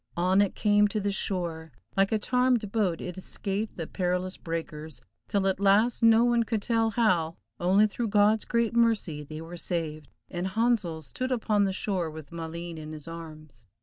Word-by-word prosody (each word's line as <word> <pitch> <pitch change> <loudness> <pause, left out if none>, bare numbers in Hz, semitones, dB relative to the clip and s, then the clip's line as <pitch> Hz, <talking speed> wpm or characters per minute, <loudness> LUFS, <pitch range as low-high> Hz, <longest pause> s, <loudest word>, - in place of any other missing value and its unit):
On 185 +3 +3
it 200 - 0
came 210 -1 +4
to 215 +1 -2
the 200 0 -1
shore, 170 -5 -3 0.2
like 195 0 +3
a 220 - +3
charmed 250 -2 +1
boat 195 -7 0
it 180 0 -6
escaped 200 +3 -3
the 165 - -3
perilous 180 +1 -2
breakers, 160 -2 -6 0.3
till 200 -1 0
at 190 -1 +1
last, 205 +4 +3
no 230 0 +6
one 240 -1 +3
could 220 -2 -1
tell 225 -1 +2
how, 185 -8 +1 0.2
only 190 +4 +4
through 220 +3 -2
God's 210 +1 +3
great 235 -1 0
mercy, 220 -10 +2
they 155 +2 -8
were 170 +2 -8
saved, 160 -3 -3 0.2
and 180 +1 -3
Handsel 195 -6 0
stood 255 - -4
upon 215 -4 +2
the 195 - 0
shore 190 -3 -1
with 155 -2 -10
Maleen 165 0 -6
in 155 0 -8
his 155 0 -9
arms. 155 -8 -10
190 Hz, 180 wpm, -28 LUFS, 165-215 Hz, 0.3 s, no